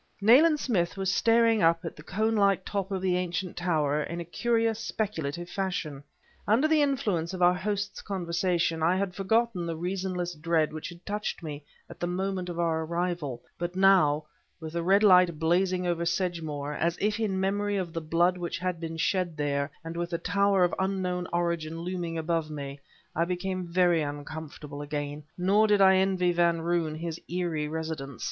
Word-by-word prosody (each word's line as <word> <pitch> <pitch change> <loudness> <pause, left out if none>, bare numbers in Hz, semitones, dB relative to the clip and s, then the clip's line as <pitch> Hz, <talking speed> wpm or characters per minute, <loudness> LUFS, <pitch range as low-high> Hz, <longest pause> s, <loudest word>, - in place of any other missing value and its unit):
Nayland 285 +10 +6
Smith 190 -10 0
was 190 -1 0
staring 230 -1 +4
up 165 0 +3
at 165 - -5
the - - -12
cone 215 +7 0
like 200 -2 +3
top 200 -1 -2
of 190 -2 -3
the 185 -1 +2
ancient 180 0 -3
tower 155 -4 +1
in 170 +3 -4
a 170 - -5
curious, 225 +4 0
speculative 175 -8 -3
fashion. 175 -6 -3 0.5
Under 235 +9 +4
the 310 -1 +3
influence 210 - 0
of 180 - -1
our 175 0 +6
host's 205 +2 -3
conversation 175 -3 -1
I 170 +3 +3
had 190 -1 -1
forgotten 200 -1 0
the 165 - -2
reasonless 180 +1 -3
dread 160 -1 0
which 155 +1 -5
had 175 0 -13
touched 210 -3 -3
me 150 -2 -6 0.2
at - - -12
the 175 - -1
moment 185 0 -2
of 170 -1 -5
our 165 -1 +1
arrival, 170 -6 -3 0.2
but 175 +1 -3
now, 180 -6 +4 0.3
with 160 -1 -7
the 170 - -1
red 195 +4 +4
light 180 -5 +6
blazing 180 +3 +1
over 170 -1 0
Sedgemoor, 165 -5 -2
as 170 +3 0
if 210 +1 0
in 200 -4 0
memory 205 +2 0
of 175 -4 -3
the 165 - -3
blood 170 +3 +2
which 175 -1 -3
had 180 -1 -2
been 165 -1 -5
shed 175 -1 0
there, 140 -1 -1
and 165 +1 -6
with 170 0 -2
the 170 - -1
tower 200 +1 +2
of 175 - +2
unknown 185 -2 -1
origin 170 -2 -1
looming 175 -2 -3
above 165 -1 -1
me, 140 -2 -6 0.4
I 165 - +2
became 185 0 -3
very 175 -1 +3
uncomfortable 145 0 -6
again, 145 0 -4
nor 200 +4 +3
did 205 -1 +4
I 190 -1 +6
envy 185 -2 +2
Van 170 -1 +2
Roon 165 -2 0
his 165 0 -5
eerie 170 -4 -1
residence. 155 -4 -5
175 Hz, 185 wpm, -28 LUFS, 165-190 Hz, 0.5 s, Nayland